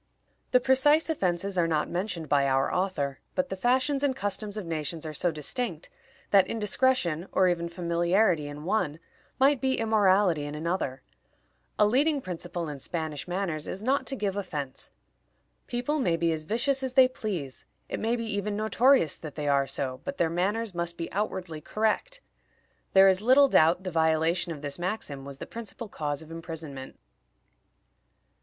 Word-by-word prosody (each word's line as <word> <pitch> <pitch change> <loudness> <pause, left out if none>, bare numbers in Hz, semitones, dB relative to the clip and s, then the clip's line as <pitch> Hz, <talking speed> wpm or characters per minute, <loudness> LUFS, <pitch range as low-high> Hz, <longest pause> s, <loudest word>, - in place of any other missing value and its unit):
The 250 - +5
precise 290 +5 +3
offenses 185 - -1
are 170 - +3
not 155 -2 0
mentioned 180 -3 -3
by 140 -1 +3
our 135 0 +1
author, 160 -8 -1 0.2
but 275 0 0
the - - -3
fashions 260 +7 +1
and 280 -2 +1
customs 205 -2 -3
of 210 - -4
nations 160 0 -4
are 155 - -5
so 175 +4 +1
distinct, 245 - -3 0.4
that 195 -2 +6
indiscretion, 210 -6 +1
or 185 - +3
even 170 -1 -1
familiarity 170 -1 +1
in 145 +1 -8
one, 165 -5 0 0.4
might 270 -1 +4
be 265 0 +1
immorality 200 -7 +3
in 145 0 -5
another. 155 -4 -2 0.7
A 210 - +5
leading 280 +7 +2
principle 175 -5 -5
in 145 -2 -6
Spanish 160 +1 -3
manners 175 -4 -2
is 195 - -5
not 270 +4 +1
to 270 - -1
give 200 -5 -2
offense. 150 -9 -5 0.8
People 250 +6 -1
may 175 -10 +1
be 165 0 +1
as 155 -1 -3
vicious 255 - 0
as 260 -1 -3
they 260 -1 +7
please; 185 - -5 0.2
it - - -4
may 230 +2 0
be 230 -1 -3
even 205 -1 -2
notorious 220 - +3
that 155 -3 -9
they 150 -1 -3
are 140 -1 +3
so, 130 -1 -3
but 280 - -5
their 165 -2 +1
manners 200 +5 -1
must 170 0 -1
be 165 - -5
outwardly 185 -5 -3
correct. 220 - -1 0.7
There 195 0 +8
is 190 0 +3
little 260 +5 +6
doubt 170 -5 +4
the 185 - -4
violation 160 +1 +1
of 150 -3 -7
this 145 +3 -4
maxim 175 -7 -4
was 140 -1 -8
the - - -7
principal 230 0 -7
cause 150 -5 -4
of 160 - -14
imprisonment. 160 -5 -7
185 Hz, 170 wpm, -28 LUFS, 160-225 Hz, 0.8 s, There